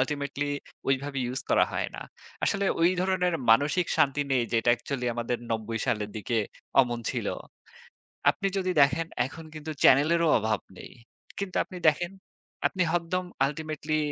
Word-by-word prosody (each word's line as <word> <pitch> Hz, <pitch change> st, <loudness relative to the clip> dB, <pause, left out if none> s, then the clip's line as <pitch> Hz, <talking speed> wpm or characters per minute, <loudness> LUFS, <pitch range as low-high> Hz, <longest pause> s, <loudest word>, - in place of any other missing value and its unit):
Ultimately 140 Hz, +1 st, -1 dB, 0.4 s
ওইভাবে 135 Hz, +1 st, 0 dB
use 125 Hz, +2 st, -3 dB
করা -, -, +5 dB
হয় -, -, -1 dB
না। -, -, -6 dB, 0.4 s
আসলে 200 Hz, 0 st, +1 dB, 0.2 s
ওই 170 Hz, +1 st, +5 dB
ধরনের 180 Hz, -1 st, +1 dB, 0.2 s
মানসিক 145 Hz, +9 st, +4 dB
শান্তি 140 Hz, +1 st, +3 dB
নেই, 130 Hz, -2 st, +3 dB
যেটা 115 Hz, +1 st, +2 dB
অ্যাকচুয়ালি 125 Hz, +1 st, -3 dB
আমাদের 120 Hz, +1 st, -2 dB
৯০ 115 Hz, 0 st, -2 dB
সালের 105 Hz, -4 st, -1 dB
দিকে 110 Hz, +3 st, -2 dB, 0.4 s
অমন 120 Hz, -2 st, 0 dB
ছিল। -, -, -3 dB, 1.0 s
আপনি 195 Hz, -, 0 dB
যদি 185 Hz, -1 st, 0 dB
দেখেন 140 Hz, +4 st, +3 dB, 0.2 s
এখন 160 Hz, +5 st, -9 dB
কিন্তু 155 Hz, 0 st, -6 dB
চ্যানেলেরও 165 Hz, +5 st, +5 dB
অভাব 110 Hz, -2 st, 0 dB, 0.2 s
নেই। -, -, -10 dB, 0.5 s
কিন্তু 195 Hz, -2 st, -4 dB
আপনি 185 Hz, -, -10 dB
দেখেন 175 Hz, +3 st, +2 dB, 0.6 s
আপনি 185 Hz, -, -4 dB
হদ্দম 175 Hz, +2 st, 0 dB, 0.2 s
আল্টিমেটলি 155 Hz, +1 st, -2 dB
145 Hz, 145 wpm, -27 LUFS, 125-170 Hz, 1.0 s, করা